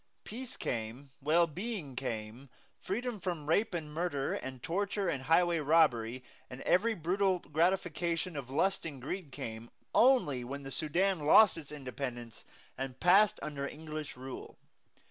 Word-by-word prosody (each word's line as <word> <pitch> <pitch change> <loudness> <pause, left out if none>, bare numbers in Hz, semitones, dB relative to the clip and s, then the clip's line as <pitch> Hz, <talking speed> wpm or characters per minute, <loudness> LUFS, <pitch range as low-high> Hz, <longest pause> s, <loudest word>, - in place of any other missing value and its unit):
Peace 255 +3 -7
came, 120 +4 -4
well 160 +5 +4
being 175 - -5
came, 120 0 -5 0.3
freedom 235 +3 -3
from 170 -4 -3
rape 195 +4 +2
and 155 -3 -5
murder 155 -4 -1
and 130 -2 -6
torture 200 +2 -1
and 140 -6 -1
highway 170 +2 +4
robbery, 130 -6 +3 0.3
and 125 +1 -8
every 220 +5 +3
brutal 185 +3 +1
gratification 170 +1 0
of 135 -3 -5
lust 190 +8 +1
and 150 -5 -6
greed 150 +4 -5
came, 115 -4 -6 0.2
only 230 - +4
when 140 +3 -6
the 135 - -7
Sudan 175 +6 +1
lost 170 +8 +7
its 155 -3 -9
independence 125 -5 -6 0.4
and 130 -1 -4
passed 195 +4 +5
under 140 -2 -3
English 155 -2 -7
rule. 130 0 -8
155 Hz, 145 wpm, -32 LUFS, 135-180 Hz, 0.4 s, lost